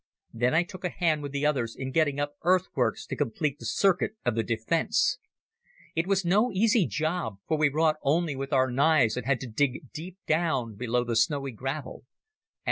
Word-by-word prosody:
Then 125 +5 +1
I 165 - +4
took 185 0 -11
a 180 - 0
hand 160 -4 0
with 145 -1 -5
the 140 +1 -1
others 125 -6 0
in 130 0 -5
getting 145 -1 +1
up 145 0 -2
earthworks 185 +3 +1
to - - -5
complete 145 +2 -2
the - - -6
circuit 195 +1 +2
of 120 - +2
the 115 - +1
defence. 115 +9 0 0.8
It 165 +2 0
was 195 -2 +1
no 210 +8 +3
easy 210 0 +3
job, 155 - -2
for 160 - +1
we 150 -1 +3
wrought 155 +2 +2
only 155 +1 +1
with 135 +1 -5
our 130 -2 +3
knives 140 -4 +3
and 125 -1 -4
had 135 -3 +2
to 130 - -5
dig 130 +3 -1
deep 175 +4 -8
down 155 -8 0
below 120 +3 -1
the 120 -1 -2
snowy 135 +4 +1
gravel. 135 +3 -5
145 Hz, 195 wpm, -27 LUFS, 125-165 Hz, 0.8 s, I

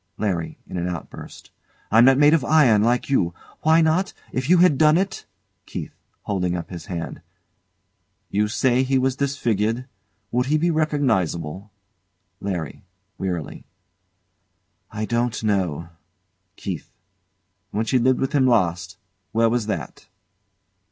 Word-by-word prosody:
LARRY. 90 -6 -2
[In - - -7
an 85 0 -2
outburst] 85 -2 -9 0.4
I'm 115 +3 +7
not 135 0 +6
made 150 +2 +6
of 160 -5 +3
iron, 130 -10 +4
like 120 +2 +1
you. 90 -11 +1 0.3
Why 160 +1 +4
not? 165 +4 +1 0.2
If 130 +3 -3
you 180 - +6
had 170 -6 +4
done 155 +1 +5
it! 190 +1 -2 0.4
KEITH. - - -6 0.3
[Holding 90 -3 -1
up 85 - -7
his 85 -2 -8
hand] 85 -2 -5 1.1
You 105 +1 +1
say 125 +3 +2
he 135 0 +1
was 130 0 +1
disfigured. 120 -4 -1 0.5
Would 125 +1 0
he 155 +2 +2
be 170 +3 +1
recognisable? 105 - -1 0.7
LARRY. 90 -3 -4 0.4
[Wearily] 90 -8 -4 1.2
I 110 0 -4
don't 120 0 -1
know. 90 -6 -1 0.7
KEITH. - - -6 0.8
When 110 +2 -2
she 130 +3 +2
lived 130 +1 +2
with 135 - -1
him 135 -3 +3
last 90 -7 +1 0.4
where 115 0 +3
was 120 -3 0
that? 105 - -5
115 Hz, 135 wpm, -23 LUFS, 95-140 Hz, 1.2 s, I'm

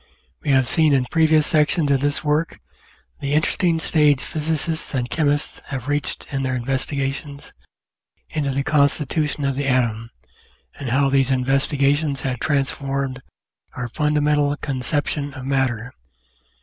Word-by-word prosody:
We - - -4
have 130 -2 +4
seen 155 +3 +3
in 130 -2 +2
previous 160 -2 +4
sections 150 -1 +2
of 135 - +3
this 145 +2 0
work 150 +2 0 0.6
the 140 +1 -2
interesting 165 +2 +2
stage 150 -3 +3
Physicists 160 0 -2
and 125 -2 -1
Chemists 145 +2 0
have 135 -2 -5
reached 145 0 -2
in 135 - -1
their 130 -1 -1
investigations 135 +3 -3 0.7
into 150 -3 -2
the 135 +1 -1
constitution 150 0 +1
of 135 -1 0
the 140 0 -2
atom, 115 -3 0 0.7
and 135 -3 -4
how 135 +3 +2
these 135 -1 +3
investigations 140 +2 +1
have 125 -3 -2
transformed 135 -2 -1 0.5
our 125 -1 -3
fundamental 150 +1 +1
conception 145 +1 -2
of 130 -1 -7
matter. 130 -4 -1
140 Hz, 135 wpm, -21 LUFS, 135-150 Hz, 0.7 s, have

